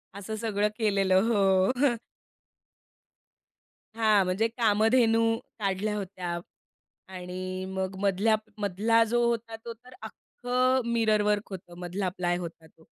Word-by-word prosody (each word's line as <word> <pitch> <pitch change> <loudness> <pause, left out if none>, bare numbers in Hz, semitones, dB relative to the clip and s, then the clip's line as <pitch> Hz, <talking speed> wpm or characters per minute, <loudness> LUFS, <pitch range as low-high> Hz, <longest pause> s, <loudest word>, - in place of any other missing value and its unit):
असं 205 +2 -5
सगळं 210 -2 0
केलेलं 195 -4 +3
हो. 195 -4 +3 0.2
हं. 275 -4 +4 2.0
हां. 215 -3 +4
म्हणजे 185 +5 +1
कामधेनू 225 0 +3 0.4
काढल्या 200 +1 -1
होत्या. 180 -3 -4 0.7
आणि 185 0 -6
मग 190 0 -3
मधल्या 200 +3 +2 0.2
मधला 210 +3 +2
जो 240 +2 +1
होता 230 -1 -2
तो 235 - -5
तर 250 +3 -18
अख्खं 250 +4 -1
मिररवर्क 215 -2 +1
होतं, 175 -2 -9
मधला 180 +2 -2
प्लाय 175 -1 0
होता 170 -2 -8
तो. 160 0 -24
205 Hz, 115 wpm, -27 LUFS, 185-225 Hz, 2.0 s, हं